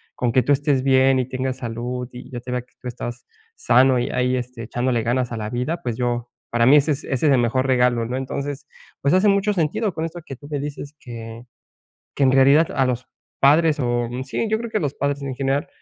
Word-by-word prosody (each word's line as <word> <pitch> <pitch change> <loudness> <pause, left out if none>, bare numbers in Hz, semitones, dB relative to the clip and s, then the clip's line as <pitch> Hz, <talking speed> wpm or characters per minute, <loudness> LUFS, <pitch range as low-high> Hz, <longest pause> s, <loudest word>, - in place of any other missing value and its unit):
con 120 -2 -1
que 130 - +4
tú 145 - 0
estés 140 -2 +2
bien 135 0 +4
y 130 0 -2
tengas 130 0 -3
salud, 125 +1 -4
y 125 +1 -10
yo 125 -3 -6
te 125 +1 -7
vea 125 0 -1
que 125 - -26
tú 125 - -7
estás 120 0 -7 0.3
sano, 135 - +4
y 120 - -1
ahí, 125 0 +1
este, 125 -1 -5
echándole 120 +1 -1
ganas 120 +1 0
a 115 - -3
la 105 0 -4
vida, 125 +8 -2
pues, 120 -3 -3
yo 120 -1 -2 0.2
para 115 0 +2
mí, 140 +4 +7
ese 150 +2 +2
es 140 - -6
ese 135 +4 0
es 145 - +5
el 130 - +4
mejor 120 +2 +1
regalo, 125 -2 +2
¿no?" 125 +2 -3
Entonces, 140 +2 -4 0.4
pues, 140 +3 +2
hace 185 +3 +4
mucho 200 +1 +3
sentido 185 +4 0
con 160 0 -3
esto 170 +1 -7
que 135 - -8
tú 145 - -13
me 145 - -2
dices, 145 0 -7
que 115 -1 -8 0.7
que 140 - +1
en 130 - +5
realidad 140 +4 +5
a 135 -2 +2
los 125 0 -3 0.3
padres, 150 +2 +4
oh, 120 -2 0
mm, 125 +2 -4
sí, 180 +11 -2
yo 220 - +2
creo 230 0 -6
que - - 0
a - - 0
los 145 -2 -2
padres 140 0 -1
en 135 -2 -4
general, 135 +2 -1
130 Hz, 245 wpm, -22 LUFS, 120-145 Hz, 0.7 s, mí